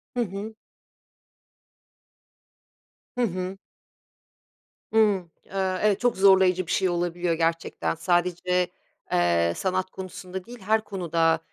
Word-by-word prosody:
Hı 245 - +1
hı. 205 +2 -6 2.6
Hı 250 - -1
hı. 185 -3 -2 1.4
Hıı, 220 - +5 0.5
ııı, 190 -1 0
evet 210 -1 +3
çok 245 -4 +1
zorlayıcı 190 -2 +5
bir - - -3
şey 190 -1 +2
olabiliyor 175 0 -1
gerçekten. 165 0 -1
Sadece, 180 +1 +1 0.4
eee, 85 -1 +3
sanat 185 0 -1
konusunda 185 0 -7
değil 240 0 -11
her 215 +2 +2
konuda 165 -5 +1
185 Hz, 105 wpm, -26 LUFS, 175-195 Hz, 2.6 s, Hıı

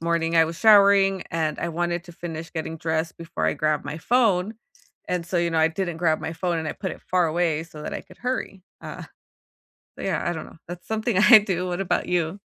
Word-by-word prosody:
morning, 165 0 0
I 165 - +6
was 165 0 -6
showering, 200 -3 +5
and 160 -2 -1
I 170 - -2
wanted 175 +1 -2
to 175 - -12
finish 165 -1 -7
getting 160 0 -5
dressed 160 +1 -2
before 165 - -4
I 80 - +2
grabbed 155 -1 0
my 150 +2 -5
phone, 220 -2 +2 0.5
and 175 -2 -2
so, 180 - -2
you 170 0 +1
know, 165 - 0
I 160 - +4
didn't 175 0 -3
grab 160 -2 +1
my 160 - -4
phone, 170 0 -2
and 160 -1 -3
I - - -2
put 190 -3 -5
it - - -12
far 180 -2 +1
away 160 -1 0
so 155 -3 -11
that - - -5
I - - -4
could - - -18
hurry, 250 -7 -3 0.2
uh, - - -8 1.0
but, - - -6
yeah, - - -1
I 175 - 0
don't 160 - -6
know. - - -15
That's 175 0 -8
something 220 -2 -1
I 220 +3 +9
do. 185 -3 -2
What 175 0 -3
about 195 - -1
you? 175 +1 -1
170 Hz, 235 wpm, -24 LUFS, 160-190 Hz, 1.0 s, I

